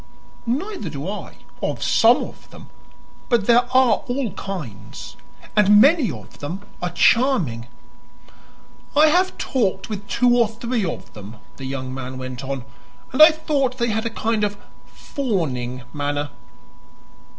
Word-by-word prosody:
"Neither 365 - -2
do 145 +3 -6
I 205 +1 -6 0.3
of - - -2
some - - +4
of - - -11
them. - - -14 0.6
But 235 -4 +2
there 240 +1 +5
are 255 -4 +4
all 245 -3 -2
kinds, 160 - -7 0.4
and 210 0 +6
many 280 - +5
of 110 -9 -10
them 175 +8 -5 0.2
are 180 - -1
charming." 175 - +2 1.3
"I 305 +1 +7
have 365 +4 +2
talked 200 -7 -1
with 200 -2 -5
two 245 0 +3
or 235 -2 +4
three 235 0 -2
of 170 - -5
them," 105 +2 -10 0.2
the 135 - -7
young 130 -1 -4
man 130 0 -6
went 130 0 -6
on, 135 -2 -4 0.5
"and 275 - +3
I 310 - +12
thought 290 -5 -1
they 235 -1 0
had 220 +1 -1
a - - -2
kind 225 -1 -1
of 205 0 -1 0.3
fawning 135 - -3
manner." 145 -1 -2
210 Hz, 145 wpm, -22 LUFS, -, 1.3 s, I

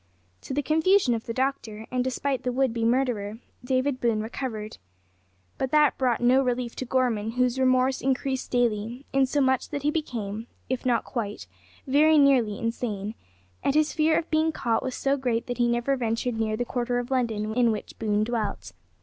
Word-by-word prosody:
To - - -6
the 290 - 0
confusion 320 -1 +3
of 225 -1 -4
the - - -2
doctor 230 -4 -2
and 250 0 0
despite 260 +1 -1
the 250 -1 -1
would 260 -1 +1
be 230 -1 -2
murderer, 230 -4 0 0.3
David 255 +1 0
Boone 230 -3 +1
recovered. 220 - -5 0.8
But 265 - 0
that 300 0 +3
brought 250 -3 +2
no 250 +2 +5
relief 245 -2 -2
to 260 - -3
Gorman, 235 -4 0
whose 250 +1 +1
remorse 255 0 +2
increased 265 0 -1
daily, 240 +1 -1
insomuch 265 -1 +2
that 285 -2 -4
he 295 - +2
became, 230 -8 -4 0.2
if 255 0 -2
not 240 -2 +2
quite, 215 -5 -4 0.4
very 305 +3 +4
nearly, 255 -8 +4
insane, 220 -3 -3 0.5
and 275 - +1
his 310 0 +2
fear 315 0 +3
of 335 - -3
being 315 0 +2
caught 230 -7 0
was 260 - -4
so 275 +1 +1
great 245 -4 -1
that 245 0 -5
he 240 - +3
never 240 +3 +1
ventured 235 0 -1
near 215 -1 0
the 245 - -1
quarter 245 0 -1
of 245 +1 -4
London 220 -4 0
in 240 -1 +3
which 215 - -5
Boone 210 -1 +1
dwelt. 220 -3 -3
250 Hz, 185 wpm, -26 LUFS, 230-270 Hz, 0.8 s, no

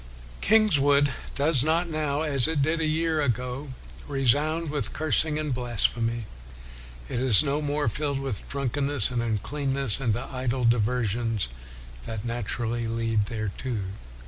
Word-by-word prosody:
" - - -18
Kingswood 145 -10 +4 0.2
does 140 -2 +2
not 165 +3 +1
now, 155 -2 -1
as 140 -5 +3
it 150 -3 +1
did 160 +3 0
a 160 - 0
year 160 0 0
ago, 125 +1 -2 0.4
resound 145 +4 +1
with 150 - -3
cursing 155 0 +1
and 150 -3 -2
blasphemy. 120 -1 -1 0.8
It 120 - -3
is 125 -6 +6
no 145 +1 -1
more 145 0 -1
filled 145 -2 -1
with 135 -7 -5
drunkenness 140 -2 +2
and 120 -2 -1
uncleanness, 135 +2 +1
and 115 -6 0
the 120 - -4
idle 130 -1 -2
diversions 115 - 0 0.6
that 110 - -5
naturally 115 0 -2
lead 115 -2 0
thereto. 110 +2 -4
135 Hz, 140 wpm, -26 LUFS, 115-150 Hz, 0.8 s, is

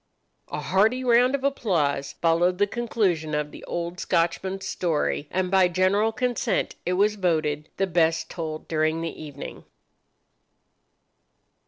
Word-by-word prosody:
A 150 - -4
hearty 215 +10 +2
round 250 +2 +4
of 275 - -5
applause 165 - 0
followed 170 +2 +2
the 205 - +4
conclusion 195 -9 -1
of 150 0 -2
the - - -11
old 175 +1 -4
Scotchman's 190 +3 0
story, 155 -5 -1
and 185 -1 -1
by 190 -2 +5
general 185 +5 +2
consent 245 +1 -1
it 180 - +1
was 205 +3 +3
voted 155 -6 -1
the 195 - +2
best 165 -2 +1
told 155 -2 -6
during 155 0 0
the 165 -1 -5
evening. 145 -2 -8
180 Hz, 135 wpm, -25 LUFS, 160-205 Hz, -, by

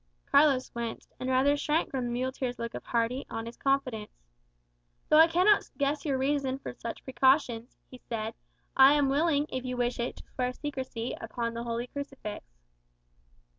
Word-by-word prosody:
Carlos 280 -3 +4
winced, 235 -1 -5
and 255 - -3
rather 265 +3 +4
shrank 300 +2 0
from 260 -2 -2
the - - -2
muleteer's 255 0 -2
look 235 0 -4
of - - -6
hearty, 235 +3 0
honest 225 +1 -6
confidence. 255 - -1 0.9
"Though 305 - +7
I 325 - +9
cannot 365 +5 +4
guess 285 +1 0
your 275 -3 +1
reason 270 -1 0
for 270 - -7
such 235 -1 -7
precautions," 260 -2 +2
he 255 - -12
said, 225 -2 -4 0.4
"I 270 +1 +8
am 285 -2 +3
willing, 290 +1 +2
if 260 -1 -3
you 250 -1 -3
wish 245 0 0
it, 240 - -2
to - - -12
swear 250 -1 -1
secrecy 260 -5 -4
upon 230 +1 -3
the 230 - -4
holy 235 +1 -2
crucifix." 275 -6 -6
260 Hz, 170 wpm, -29 LUFS, 235-280 Hz, 0.9 s, I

